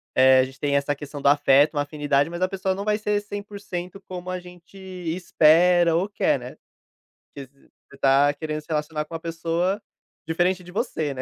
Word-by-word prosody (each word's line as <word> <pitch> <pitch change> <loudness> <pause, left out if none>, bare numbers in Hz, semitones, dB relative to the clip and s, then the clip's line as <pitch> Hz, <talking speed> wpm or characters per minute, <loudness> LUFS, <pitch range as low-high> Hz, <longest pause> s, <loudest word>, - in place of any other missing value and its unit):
eh, 130 0 +6
a - - +5
gente 130 +1 -13
tem 145 -1 0
essa 140 +1 +1
questão 145 0 -8
do - - +1
afeto, 145 +1 +4
uma 145 - 0
afinidade, 145 0 0
mas 175 +1 -6
a 185 - +3
pessoa 190 -1 -2
não 200 +2 -5
vai 210 0 +1
ser 210 -1 0
100% 200 -2 -7
como 185 0 -7
a 185 0 -3
gente 180 +1 -15
espera 175 -2 +2
ou 185 +4 +1
quer, 195 - +1
né. 125 +1 -10 0.8
Porque 140 -2 -9 0.4
você 140 - -15
está 140 +1 +3
querendo 155 +1 -4
se 150 - -26
relacionar 150 0 -2
com 160 - -14
uma - - -4
pessoa 170 +4 -2 0.5
diferente 175 +3 +1
de 180 - -12
você, 160 - -2
né, 130 - -5
165 Hz, 200 wpm, -24 LUFS, 145-185 Hz, 0.8 s, eh